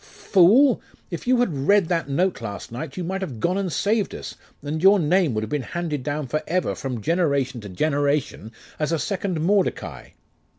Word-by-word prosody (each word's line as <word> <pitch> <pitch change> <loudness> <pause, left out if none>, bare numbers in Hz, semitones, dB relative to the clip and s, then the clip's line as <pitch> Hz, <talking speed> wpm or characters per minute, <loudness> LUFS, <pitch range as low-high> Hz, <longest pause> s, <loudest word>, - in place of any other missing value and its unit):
'Fool! 220 +8 +4 0.3
if 170 - -6
you 255 0 +4
had 195 -11 0
read 200 -3 +4
that 165 -4 -1
note 175 +2 0
last 105 -1 -6
night, 135 +6 -6
you 180 - -2
might 190 +3 -3
have 135 - -5
gone 175 +11 +1
and 195 -3 -1
saved 205 +4 0
us, - - -7 0.3
and 155 +2 -3
your 195 +2 +7
name 165 - +2
would 110 - -1
have 110 - -5
been 150 - 0
handed 150 +3 -3
down 145 +2 -3
for 155 +5 -2
ever 180 +1 0
from 125 -4 -5
generation 140 - 0
to 100 - -9
generation 145 - -1 0.3
as 150 +1 0
a 165 - +2
second 185 0 -2
Mordecai. 195 +3 0
160 Hz, 195 wpm, -23 LUFS, 140-185 Hz, 0.3 s, your